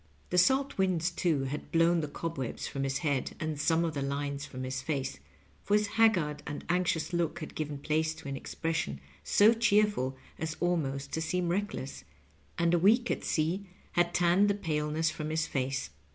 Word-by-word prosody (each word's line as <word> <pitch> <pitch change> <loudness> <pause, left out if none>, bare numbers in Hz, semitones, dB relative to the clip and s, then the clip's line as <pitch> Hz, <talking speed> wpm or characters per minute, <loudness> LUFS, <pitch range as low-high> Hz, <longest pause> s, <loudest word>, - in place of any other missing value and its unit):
The 180 - +4
salt 265 +5 +3
winds, 180 -2 +2
too, 165 -5 +1
had 135 +3 -5
blown 165 0 +4
the 150 - -2
cobwebs 145 -3 -4
from 135 - -4
his 135 0 0
head 140 -4 0
and 155 -2 -2
some 165 +1 +3
of 165 - -2
the 140 - -2
lines 140 +1 -2
from 130 -1 -6
his 130 0 -3
face, 135 - -3 0.4
for 205 - +2
his 210 0 +3
haggard 175 -11 +3
and 145 - -5
anxious 175 -2 +1
look 170 -2 0
had 155 - -7
given 150 -2 -3
place 155 +2 0
to - - -10
an 140 - -3
expression 135 - -3 0.2
so 215 +3 +5
cheerful 210 - +2 0.2
as 160 0 -3
almost 145 -6 -1
to 160 - -2
seem 175 +2 0
reckless, 180 -7 -3 0.5
and 170 0 +2
a 175 - +4
week 230 +7 +4
at - - -2
sea 170 +6 0 0.2
had 175 0 +2
tanned 175 +4 +4
the 200 - +2
paleness 155 -3 0
from 155 -1 -5
his 160 0 0
face. 135 - -2
160 Hz, 185 wpm, -30 LUFS, 145-180 Hz, 0.5 s, so